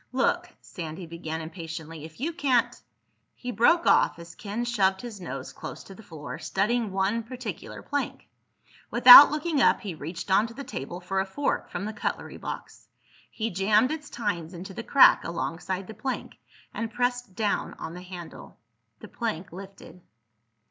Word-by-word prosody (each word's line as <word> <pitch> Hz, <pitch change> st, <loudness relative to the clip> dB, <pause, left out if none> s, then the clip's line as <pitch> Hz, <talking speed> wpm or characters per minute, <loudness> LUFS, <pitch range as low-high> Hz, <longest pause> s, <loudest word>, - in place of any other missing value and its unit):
"Look," 260 Hz, +1 st, +1 dB
Sandy 165 Hz, 0 st, -7 dB
began 160 Hz, -1 st, -5 dB
impatiently, 160 Hz, -1 st, -7 dB
"if 160 Hz, +4 st, -13 dB
you 320 Hz, +6 st, -2 dB
can't—" 265 Hz, -7 st, +1 dB, 0.6 s
He 245 Hz, -, -5 dB
broke 245 Hz, -, +4 dB
off -, -, +4 dB
as 170 Hz, 0 st, -11 dB
Ken 210 Hz, +6 st, -4 dB
shoved 195 Hz, -5 st, +1 dB
his 225 Hz, -5 st, -8 dB
nose -, -, -6 dB
close -, -, -8 dB
to 195 Hz, -, -12 dB
the 220 Hz, -, -13 dB
floor, 160 Hz, -8 st, -8 dB
studying 215 Hz, +2 st, 0 dB
one 195 Hz, +4 st, 0 dB
particular 250 Hz, +2 st, -7 dB
plank. 285 Hz, -1 st, -3 dB, 0.6 s
Without 250 Hz, +4 st, +11 dB
looking 300 Hz, -1 st, 0 dB
up -, -, +4 dB
he 200 Hz, -5 st, -5 dB
reached 165 Hz, +5 st, -6 dB
onto 225 Hz, +4 st, +3 dB
the 280 Hz, -, -6 dB
table 175 Hz, -, -6 dB
for 190 Hz, +1 st, -2 dB
a 190 Hz, -, +1 dB
fork 280 Hz, +9 st, -2 dB
from 195 Hz, -, -4 dB
the 215 Hz, -, -4 dB
cutlery 210 Hz, -, -4 dB
box. -, -, -8 dB, 0.4 s
He 225 Hz, 0 st, -3 dB
jammed 210 Hz, -, +3 dB
its 305 Hz, -2 st, -5 dB
tines 185 Hz, -7 st, -3 dB
into 190 Hz, +3 st, -8 dB
the 230 Hz, -, -5 dB
crack 275 Hz, +3 st, +6 dB
alongside 175 Hz, +3 st, -3 dB
the 220 Hz, -, -9 dB
plank 235 Hz, +5 st, -5 dB, 0.3 s
and 225 Hz, -1 st, -4 dB
pressed 245 Hz, -3 st, -2 dB
down 210 Hz, -1 st, -1 dB
on 160 Hz, -, -7 dB
the 180 Hz, -, -8 dB
handle. 180 Hz, -2 st, -10 dB, 0.4 s
The -, -, -9 dB
plank 195 Hz, -8 st, -4 dB
lifted. 190 Hz, -2 st, -11 dB
200 Hz, 165 wpm, -27 LUFS, 175-240 Hz, 0.6 s, Without